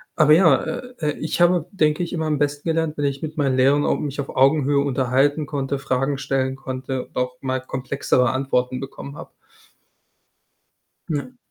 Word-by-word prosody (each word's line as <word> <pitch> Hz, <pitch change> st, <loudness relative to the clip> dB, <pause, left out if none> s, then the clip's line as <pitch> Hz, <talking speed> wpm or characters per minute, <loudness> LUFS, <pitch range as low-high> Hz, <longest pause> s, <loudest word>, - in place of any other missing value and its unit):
aber 155 Hz, -1 st, +5 dB
ja, 165 Hz, -3 st, +6 dB
äh, 250 Hz, 0 st, -5 dB
äh, 150 Hz, -2 st, -1 dB
ich 160 Hz, +2 st, -2 dB
habe, 175 Hz, -2 st, +4 dB
denke 160 Hz, -2 st, +1 dB
ich, 170 Hz, -, -5 dB
immer 160 Hz, -2 st, -1 dB
am 150 Hz, -1 st, +1 dB
besten 145 Hz, +2 st, -1 dB
gelernt, 160 Hz, -1 st, 0 dB
wenn 145 Hz, -, -1 dB
ich 140 Hz, +1 st, -2 dB
mit 155 Hz, 0 st, -5 dB
meinen 135 Hz, -3 st, +1 dB
Lehrern 140 Hz, +3 st, +4 dB
au -, -, +2 dB
mich 145 Hz, -1 st, -4 dB
auf 135 Hz, -, -8 dB
Augenhöhe 140 Hz, +1 st, +3 dB
unterhalten 140 Hz, +2 st, +1 dB
konnte, 140 Hz, -2 st, -2 dB
Fragen 135 Hz, +1 st, -1 dB
stellen 130 Hz, -1 st, -1 dB
konnte 130 Hz, -1 st, -5 dB
und -, -, -33 dB
auch 125 Hz, 0 st, -2 dB
mal 130 Hz, -1 st, -1 dB
komplexere 130 Hz, -1 st, 0 dB
Antworten 130 Hz, -1 st, 0 dB
bekommen 140 Hz, +1 st, -8 dB
habe. -, -, -10 dB, 1.8 s
Ja. 160 Hz, -, -3 dB
140 Hz, 175 wpm, -22 LUFS, 130-155 Hz, 1.8 s, ja